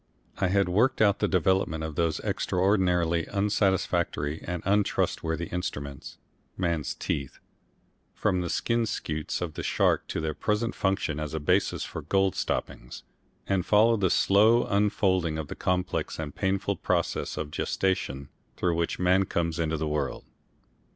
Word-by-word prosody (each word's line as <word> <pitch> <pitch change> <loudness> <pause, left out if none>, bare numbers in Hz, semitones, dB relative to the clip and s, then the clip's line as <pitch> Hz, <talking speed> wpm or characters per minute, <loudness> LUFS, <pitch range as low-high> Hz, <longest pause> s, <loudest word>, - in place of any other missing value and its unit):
I 95 - +2
had 100 0 +2
worked 115 +9 +2
out 105 -2 +4
the 105 - +2
development 90 -3 +1
of 80 -1 -4
those 80 0 0
extraordinarily 90 -3 +1
unsatisfactory 95 -7 0
and 90 -1 -4
untrustworthy 85 -4 0
instruments, 70 -6 -5 0.4
man's 85 -6 -1
teeth, 70 -2 -3 0.8
from 95 -4 +1
the 85 - -3
skin 115 +4 0
scutes 75 -6 -3
of 85 -3 -3
the - - -5
shark - - +1
to - - -3
their 80 -1 -2
present 105 +6 -1
function 95 -6 -1
as 75 0 -4
a - - -1
basis 75 - +1
for - - -6
gold 95 +5 +1
stoppings, - - -4 0.4
and 95 -2 0
followed 110 +2 +4
the 95 - +3
slow 110 +7 +4
unfolding 95 -5 +1
of 80 -2 -5
the - - -5
complex 90 0 -1
and 75 -3 -5
painful 100 0 -1
process 85 -2 -1
of 75 -1 -4
gestation 70 -10 -1 0.3
through 90 -2 +1
which 85 0 -1
man 90 +2 +3
comes 85 -2 -1
into 80 -1 0
the 80 0 -2
world. 75 0 -2
90 Hz, 150 wpm, -27 LUFS, 80-100 Hz, 0.8 s, out